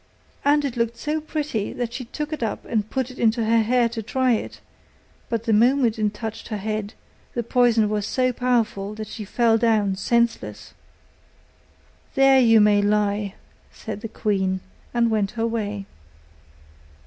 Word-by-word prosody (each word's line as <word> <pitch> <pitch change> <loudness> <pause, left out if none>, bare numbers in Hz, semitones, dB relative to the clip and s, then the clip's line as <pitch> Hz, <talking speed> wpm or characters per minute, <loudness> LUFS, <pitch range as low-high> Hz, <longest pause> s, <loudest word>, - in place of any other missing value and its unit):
And 290 +1 +3
it 265 -3 -3
looked 235 0 -1
so 300 +5 -2
pretty, 300 -9 -3
that 240 -1 -4
she 255 0 -5
took 300 +6 -5
it 305 - -5
up 220 -3 -3
and 215 -2 -1
put 260 -1 -2
it 255 - -13
into 230 0 +2
her 230 +1 +4
hair 240 +2 +3
to 230 -1 -5
try 255 +4 +1
it; 225 - -2 0.7
but 230 -1 -1
the 225 -2 +1
moment 235 0 +3
it 210 -1 +1
touched 220 0 -6
her 215 - -3
head, 215 0 -4 0.4
the 240 - -1
poison 235 -2 +3
was 210 -1 -1
so 255 -1 +1
powerful 230 -5 0
that 215 0 -5
she 215 - -7
fell 225 +2 +2
down 215 -4 +2
senseless. 235 +4 -1 1.4
'There 270 0 +6
you 225 -3 +6
may 210 -1 +5
lie,' 205 -1 0 0.4
said 210 -2 -7
the 225 - -5
queen, 190 -4 -1 0.3
and 235 -1 +2
went 210 -3 +1
her 225 - +1
way. 210 -3 -3
225 Hz, 165 wpm, -23 LUFS, 210-245 Hz, 1.4 s, There